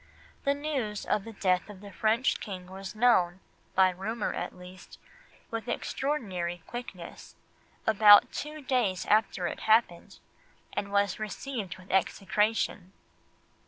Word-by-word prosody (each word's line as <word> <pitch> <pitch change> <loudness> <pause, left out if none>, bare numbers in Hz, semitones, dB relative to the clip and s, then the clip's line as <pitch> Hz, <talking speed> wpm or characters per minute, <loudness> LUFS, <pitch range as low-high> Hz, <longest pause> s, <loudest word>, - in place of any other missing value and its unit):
The 280 0 +3
news 270 -8 -3
of 200 - 0
the 225 - -7
death 185 -2 0
of 205 -2 -10
the 200 0 -11
French 225 +6 +1
King 185 -4 -7
was 190 +2 -8
known, 190 -7 +3 0.4
by 185 -1 +5
rumour 210 +5 -3
at - - -5
least, 180 +1 -13 0.5
with 230 +1 -4
extraordinary 190 - -2
quickness, 195 -8 -9 0.5
about 210 -1 +7
two 300 0 -6
days 235 -9 0
after 210 -4 +2
it - - -3
happened, 220 -6 +2 0.6
and 200 0 -3
was 200 -1 +1
received 215 -2 -5
with 185 0 -12
execration. 195 0 0
205 Hz, 125 wpm, -29 LUFS, 185-230 Hz, 0.6 s, about